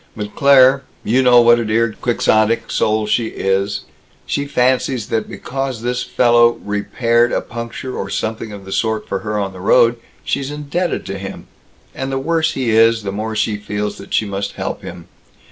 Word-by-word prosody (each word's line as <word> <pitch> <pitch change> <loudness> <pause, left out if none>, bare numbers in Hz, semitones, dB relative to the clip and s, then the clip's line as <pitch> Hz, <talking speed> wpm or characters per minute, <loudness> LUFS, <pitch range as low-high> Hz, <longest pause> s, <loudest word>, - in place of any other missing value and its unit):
But 105 -1 -5
Claire 135 -1 +6 0.2
you 125 +5 +2
know 125 -1 +6
what 120 0 +5
a 115 - -2
dear 110 +1 +1
Quixotic 115 -1 +1
soul 110 0 +1
she 110 +2 0
is 100 0 -1 0.4
she 140 0 -2
fancies 125 -3 0
that 110 -1 -1
because 135 -3 -4
this 125 +1 -1
fellow 120 -1 +4
repaired 115 +3 +1
a - - +1
puncture 115 +2 -6
or 95 - -4
something 110 +1 -3
of 100 -2 -10
the 95 - -9
sort 110 +1 -1
for 95 - -2
her 105 0 -3
on 100 -2 -2
the 95 - -10
road, 120 +4 +4 0.3
she's 140 -1 -2
indebted 150 +4 -3
to 95 - -5
him, 95 0 -8 0.5
and 135 0 -4
the 135 - -1
worse 160 +3 0
he 125 -4 -1
is, 115 0 +4
the 100 - -3
more 110 +2 -4
she 105 0 0
feels 105 0 -4
that 100 - -12
she 110 - +1
must 100 0 -4
help - - -4
him. - - -9
115 Hz, 185 wpm, -18 LUFS, 105-125 Hz, 0.5 s, Claire